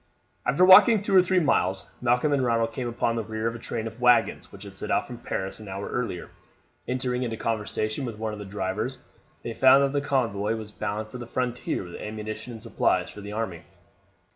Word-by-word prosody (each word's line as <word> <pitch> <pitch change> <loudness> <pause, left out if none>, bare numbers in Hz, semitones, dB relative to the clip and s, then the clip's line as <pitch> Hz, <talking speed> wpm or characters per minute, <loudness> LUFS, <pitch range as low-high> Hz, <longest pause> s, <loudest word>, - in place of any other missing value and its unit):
After 145 +9 +4
walking 205 +4 +8
two 195 - +1
or 185 - +9
three 185 +1 +2
miles 135 - +1
Malcolm 125 +4 +2
and 135 -2 +2
Ronald 115 -1 +1
came 125 0 -3
upon 115 0 -1
the 115 - -2
rear 110 +1 -4
of 115 - 0
a 115 - -8
train 115 -1 -4
of 115 +2 -8
waggons 125 -1 +3
which - - -11
had - - -10
set - - -6
out - - +1
from - - -9
Paris 95 +2 -4
an 105 - -10
hour 100 +1 -5
earlier. 115 -8 -3 0.6
Entering 125 0 -1
into 115 -3 -3
conversation 110 +2 0
with 115 -4 -5
one 110 0 -3
of 105 - -7
the 105 - -7
drivers 100 +6 -3 0.5
they 115 - -4
found 135 +3 +6
that 140 0 0
the 145 - +1
convoy 115 -7 0
was 110 -1 -7
bound 105 +1 -4
for 125 - -8
the 120 - -7
frontier 125 -4 -2
with 90 -1 -9
ammunition 110 +2 -6
and 110 -1 -10
supplies 95 -5 0
for 105 - -10
the 100 +1 -7
army. 105 -6 -3
115 Hz, 215 wpm, -26 LUFS, 105-125 Hz, 0.6 s, or